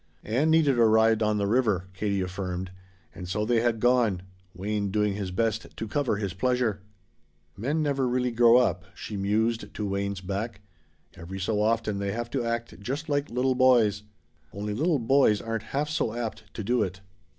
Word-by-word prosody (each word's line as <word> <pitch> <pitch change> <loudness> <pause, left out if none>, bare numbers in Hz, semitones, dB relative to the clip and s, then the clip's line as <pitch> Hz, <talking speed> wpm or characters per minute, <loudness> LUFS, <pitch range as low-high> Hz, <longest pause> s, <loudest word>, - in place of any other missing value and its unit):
Ann 130 +9 +1
needed 150 -6 +4
a - - +6
ride 110 0 +4
on 105 -1 +2
the 100 - 0
river, 105 -5 +1
Katie 100 0 -1
affirmed, 90 0 -4 0.4
and 90 -2 -8
so 105 +3 -1
they 115 0 +2
had 115 -1 +1
gone, 120 -6 +2 0.3
Wayne 100 +2 -2
doing 105 0 +1
his 100 -2 -4
best 110 +3 -2
to 110 - -4
cover 125 -2 0
his 100 -3 -3
pleasure. 115 0 0 0.7
"Men 145 +10 -1
never 140 -3 0
really 125 0 0
grow 120 0 +6
up," 95 -7 +1
she 105 - -7
mused 110 +4 0
to 105 - -2
Wayne's 100 -1 -2
back. 100 +2 -4 0.5
"Every 90 +4 -8
so 105 +2 0
often 110 -2 0
they 100 0 -2
have 120 +1 -4
to - - -1
act 115 -5 -3
just 140 +9 -4
like 145 0 0
little 130 +2 +1
boys. 120 -6 +4 0.5
Only 105 +1 -4
little 155 +8 +1
boys 125 -3 +3
aren't 115 -1 -4
half 145 +2 -1
so 150 -7 -1
apt 110 -3 -5
to 110 - -4
do 120 +4 +1
it." 95 -2 -3
110 Hz, 185 wpm, -27 LUFS, 100-125 Hz, 0.7 s, a